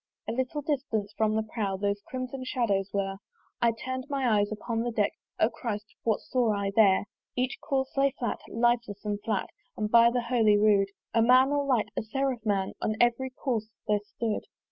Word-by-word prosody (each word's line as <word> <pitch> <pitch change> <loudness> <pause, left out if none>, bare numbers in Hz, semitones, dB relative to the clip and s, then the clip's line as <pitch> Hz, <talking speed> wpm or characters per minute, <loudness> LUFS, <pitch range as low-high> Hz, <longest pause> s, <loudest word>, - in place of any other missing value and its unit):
A - - -1
little 260 +5 -2
distance 230 -8 -2
from 215 -1 +1
the 220 - +1
prow 210 -3 -2
Those 200 +1 -1
crimson 255 0 -5
shadows 205 -7 0
were: 195 -1 -1 0.4
I 235 -1 +5
turn'd 260 +3 -5
my 255 -7 +2
eyes 205 +1 0
upon 225 +2 -3
the 240 - -1
deck 210 -3 +1 0.3
O - - +5
Christ! 215 -3 -4 0.2
what 220 -2 +1
saw 240 -4 +1
I 200 -1 -1
there? 200 -3 +5 0.3
Each 255 +1 -1
corse 265 -1 -1
lay 275 0 +4
flat, 240 - -2
lifeless 235 -3 0
and 205 -1 -2
flat; 210 -3 -2 0.3
And 210 0 -2
by 235 0 +7
the 245 +1 0
Holy 230 -4 +4
rood 205 -2 +4 0.3
A 230 - +4
man 255 +3 +6
all 285 -1 +1
light, 245 -6 +2
a - - 0
seraph 255 +1 -2
man, 200 -3 0
On 215 - 0
every 240 +2 +2
corse 240 -4 -2 0.2
there 210 -1 +3
stood. 210 +1 -4
225 Hz, 190 wpm, -28 LUFS, 210-255 Hz, 0.4 s, by